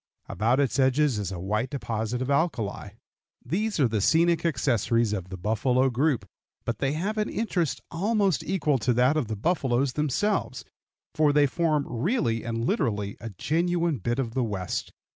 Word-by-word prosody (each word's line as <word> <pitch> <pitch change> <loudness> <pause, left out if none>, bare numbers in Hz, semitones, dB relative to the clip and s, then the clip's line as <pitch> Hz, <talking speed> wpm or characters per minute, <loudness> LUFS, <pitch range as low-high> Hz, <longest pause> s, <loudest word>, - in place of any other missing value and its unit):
About 115 +7 +1
its 140 -1 +1
edges 135 -2 +3
is 100 -2 -3
a 95 - -5
white 105 +7 -1
deposit 115 -2 -3
of 130 - -2
alkali. 115 - -1 0.5
These 205 - -1
are 135 - +5
the 110 -2 -1
scenic 165 - +3
accessories 120 - +1
of 95 -3 -4
the 95 - -6
buffalo 125 +7 +1
group, 135 +1 0 0.4
but 120 - -2
they 135 0 0
have 200 +8 -2
an 210 - 0
interest 170 - -1
almost 195 - +1
equal 155 -8 0
to 125 +3 +1
that 125 +5 +3
of 150 -7 0
the 110 - -3
buffaloes 130 - 0
themselves, 150 +9 -1 0.5
for 155 -2 +3
they 145 0 +4
form 155 0 +1
really 120 - 0
and 115 0 -2
literally 105 - -1
a 115 - -5
genuine 170 - 0
bit 120 +5 -1
of 120 -4 -2
the 130 0 0
West. 100 -5 -3
130 Hz, 170 wpm, -26 LUFS, 115-160 Hz, 0.5 s, are